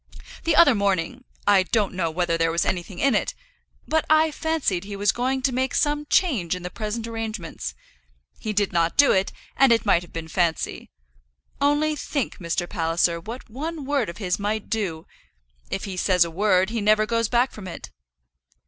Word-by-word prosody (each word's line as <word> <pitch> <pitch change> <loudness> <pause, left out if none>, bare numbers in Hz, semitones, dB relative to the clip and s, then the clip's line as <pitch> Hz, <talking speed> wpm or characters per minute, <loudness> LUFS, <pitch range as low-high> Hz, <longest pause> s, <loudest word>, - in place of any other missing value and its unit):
The 330 - +3
other 310 -6 +7
morning, 200 +4 -1 0.2
I 200 -2 +5
don't 205 +2 0
know 175 -3 -1
whether 170 +1 0
there 165 0 +1
was 170 +1 0
anything 180 +1 -3
in 275 +4 +2
it, 210 - 0 0.5
but 315 0 +2
I 310 0 +4
fancied 305 - -1
he 200 0 -7
was 200 0 +2
going 260 +2 -1
to 265 - +1
make 260 +1 -1
some 295 0 +1
change 235 - +2
in 180 - -8
the 180 - -5
present 220 +2 -4
arrangements. 225 -6 -5 0.6
He 215 - -3
did 205 -2 0
not 170 -1 +1
do 285 0 +6
it, 190 +1 +1 0.2
and 270 -2 +5
it 230 -1 +3
might 185 -4 +4
have 175 - -13
been 165 -1 -6
fancy. 165 -1 -1 0.7
Only 295 +2 +2
think, 280 -3 -3
Mr. 175 0 -2
Palliser, 170 -1 0
what 230 +9 -8
one 300 +5 -5
word 275 -6 0
of 170 - -8
his 190 -2 -1
might 210 +1 -3
do! 185 -8 -2 0.6
If 195 - -3
he 195 -3 -5
says 180 -1 +3
a 170 - -6
word, 190 +2 +2
he 230 -2 -2
never 215 +1 +4
goes 230 0 0
back 245 +2 +2
from 205 -3 -9
it." 170 - -8
210 Hz, 190 wpm, -24 LUFS, 180-255 Hz, 0.7 s, other